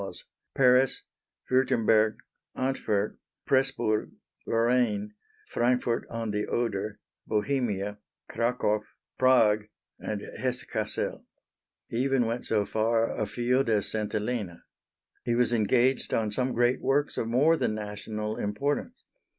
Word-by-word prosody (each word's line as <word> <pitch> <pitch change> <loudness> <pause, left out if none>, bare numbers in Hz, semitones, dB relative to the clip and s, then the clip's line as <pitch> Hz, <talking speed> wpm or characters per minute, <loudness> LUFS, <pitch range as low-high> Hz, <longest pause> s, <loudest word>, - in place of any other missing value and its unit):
Paris, 130 0 +4 0.5
Wurtemberg, 110 -4 +3 0.4
Antwerp, 110 -6 -1 0.3
Presburg, 130 -5 +1 0.4
Lorraine, 115 -3 +1 0.4
Frankfort 120 -1 +1
on 115 -2 -3
the 105 0 -1
Oder, 105 -3 -2 0.3
Bohemia, 105 -3 -1 0.3
Cracow, 115 -3 0 0.4
Prague, 110 -5 +4 0.3
and 105 -1 -4 0.2
Hesse 125 -1 -2
Cassel. - - -2 0.6
He 115 - -4
even 135 -1 +2
went 115 +2 -3
so 105 -2 +1
far 115 +2 +1
afield 120 +4 0
as 105 -2 +1
St. 110 -1 -2
Helena. 105 -5 -3 0.6
He 120 - 0
was 120 0 +2
engaged 120 +4 +2
on 110 -2 0
some 125 +3 -1
great 120 +2 +2
works 145 +2 +1
of 115 - -1
more 140 +8 +4
than 110 - -1
national 105 +1 -4
importance. 140 - -2
115 Hz, 110 wpm, -28 LUFS, 105-125 Hz, 0.6 s, Paris